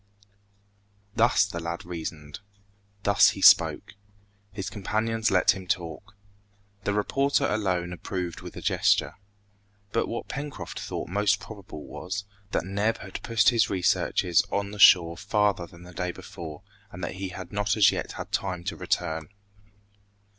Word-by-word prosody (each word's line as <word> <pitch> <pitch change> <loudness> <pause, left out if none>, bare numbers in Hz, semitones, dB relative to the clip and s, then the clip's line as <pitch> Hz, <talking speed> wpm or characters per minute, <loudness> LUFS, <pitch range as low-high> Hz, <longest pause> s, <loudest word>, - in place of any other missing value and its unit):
Thus 115 -1 +4
the 95 -4 -5
lad 85 +1 -5
reasoned. 80 -4 -6 0.6
Thus 100 -1 +6
he - - -6
spoke. - - +6 0.6
His 100 -1 -5
companions 110 +2 -1
let 90 -3 +4
him 95 -1 -6
talk. 90 +3 -4 0.7
The 100 - +1
reporter 135 +7 +1
alone 90 -4 -1
approved 90 0 -5
with - - -9
a - - -7
gesture. - - +2 0.7
But 115 - 0
what 120 - -5
Pencroft 145 -1 -6
thought - - -5
most 105 +2 +2
probable 100 -8 -10
was, 100 +2 -5 0.2
that 95 - -1
Neb 100 +4 0
had 95 -1 -8
pushed 115 -2 +3
his 120 -3 +2
researches 90 -2 +2
on 100 0 -1
the 105 - -9
shore 85 -4 +7
farther 100 -2 +1
than 85 +1 -15
the 90 0 -12
day 90 +1 -2
before, 85 0 -9 0.3
and 90 0 -9
that 90 - -4
he 95 0 -4
had 90 -1 -8
not 105 +1 0
as 105 - +6
yet - - -4
had - - -7
time 90 -3 -2
to - - -3
return. 80 0 -2
95 Hz, 150 wpm, -27 LUFS, 90-105 Hz, 0.7 s, shore